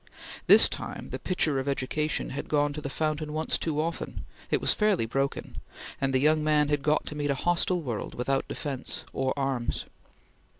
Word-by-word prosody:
This - - +9
time - - -6
the - - -4
pitcher 155 -6 +1
of 130 - -4
education 140 +3 -1
had 140 - -4
gone 145 -1 +2
to 150 - -5
the 140 - -4
fountain 155 +1 -2
once 155 +1 0
too 155 -2 -1
often; 165 +2 -3 0.2
it - - +2
was - - +3
fairly 210 - +2
broken; 135 +4 -2 0.4
and 135 -1 +2
the 130 - +3
young 155 +3 +3
man 150 -1 +3
had 145 -1 +1
got 150 +1 +2
to 150 - -6
meet 145 -1 -1
a 140 - +2
hostile 175 +3 +1
world 120 -6 -4
without 135 +2 0
defence 135 -4 -4
or 130 0 0
arms. 135 -4 -1
145 Hz, 185 wpm, -28 LUFS, 135-155 Hz, 0.4 s, This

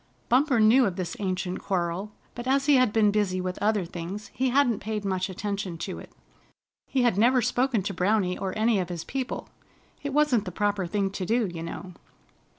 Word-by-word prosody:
Bumper 255 0 +3
knew 230 +4 +6
of 185 - -3
this 180 -3 -4
ancient 185 -2 -2
quarrel, 185 +2 -2 0.2
but 240 +1 -7
as 270 +1 +2
he 290 -2 +5
had 255 -4 +3
been 210 -1 +4
busy 200 -3 0
with 185 0 -4
other 210 -2 +2
things 180 +5 -7
he 260 0 0
hadn't 245 -4 +3
paid 210 -1 -4
much 185 -1 -1
attention 195 -2 -4
to - - -5
it. - - -12 0.8
He 260 -2 +1
had 230 -5 +2
never 250 +3 +5
spoken 245 -2 +1
to 200 - -3
Browny 185 0 +1
or 190 +1 -4
any 220 -1 +3
of 180 -1 -2
his 170 -2 -4
people. 260 +6 -4 0.5
It 285 - -3
wasn't 270 -7 +2
the 180 - -5
proper 200 0 0
thing 195 +2 -1
to 195 - -4
do, 225 +4 +1
you 175 -4 -6
know. 175 +2 -7
205 Hz, 200 wpm, -26 LUFS, 185-240 Hz, 0.8 s, knew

